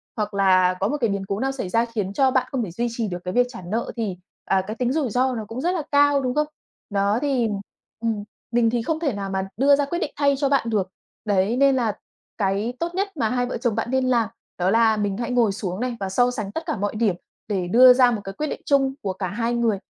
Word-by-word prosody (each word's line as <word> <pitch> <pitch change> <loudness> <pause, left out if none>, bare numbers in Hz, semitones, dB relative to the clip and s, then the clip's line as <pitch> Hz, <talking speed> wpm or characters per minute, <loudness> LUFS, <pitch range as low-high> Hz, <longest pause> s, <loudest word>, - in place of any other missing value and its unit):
hoặc 210 -2 -2
là 185 -2 +4
có 195 - +1
một 295 +5 -1
cái 230 - +2
biến 200 -1 -2
cố 195 +1 -2
nào 270 +2 0
xảy 255 -9 -5
ra 230 +4 +2
khiến 210 -5 -3
cho 265 +3 +3
bạn 255 -1 +1
không 260 -3 -1
thể 180 - -5
duy 240 +6 -1
trì 230 -2 -2
được 175 - -4
cái 180 - -4
việc 245 0 +3
trả 235 -7 -9
nợ, 215 +7 -3
thì, 210 -6 -3 0.3
à, 190 -1 +2
cái 215 - -4
tính 250 +2 0
rủi 295 -6 0
ro 255 +3 +1
nó 220 -2 -4
cũng 240 +3 -5
rất 350 +3 +1
là 320 - -2
cao, 285 -1 +4
đúng 255 +1 -2
không? 300 0 +2 0.4
Đó, 200 +2 +1
thì, 265 -5 +1 0.5
ừm, 225 -3 -1 0.3
mình 235 -1 +3
thì 235 0 0
không 315 +6 -2
thể 290 -7 0
nào 200 -1 -4
mà 190 0 -2
đưa 280 +2 +5
ra 285 0 0
quyết 345 +5 -3
định 300 - -2
thay 280 -1 +3
cho 275 -1 +1
bạn 265 -5 +2
được. 200 -4 0 0.4
Đấy, 205 +3 +1
nên 275 0 +4
là 230 -5 0 0.4
cái 205 +3 0
tốt 340 +1 -3
nhất 390 -2 -2
mà 225 -5 +1
hai 245 +1 0
vợ 250 - -4
chồng 235 -2 -1
bạn 230 +2 -2
nên 260 0 +2
làm 235 -3 +2 0.3
đó 180 +1 +1
là 225 0 +4
mình 205 -2 -1
hãy 235 +1 -3
ngồi 235 -4 +3
xuống 195 -2 -4
này 245 0 -2
và 195 -1 -3
so 245 +6 +2
sánh 215 -5 -4
tất 325 - -4
cả 315 -7 -2
mọi 205 +2 -2
điểm 215 -5 +1 0.3
để 190 -4 -1
đưa 250 +6 +8
ra 250 -1 +5
một 215 -3 -2
cái 195 - -6
quyết 305 +8 -3
định - - -5
chung 270 -2 +2
của 195 -2 -2
cả 185 0 -3
hai 230 +5 -2
người 230 -4 +1
230 Hz, 275 wpm, -23 LUFS, 200-260 Hz, 0.5 s, đưa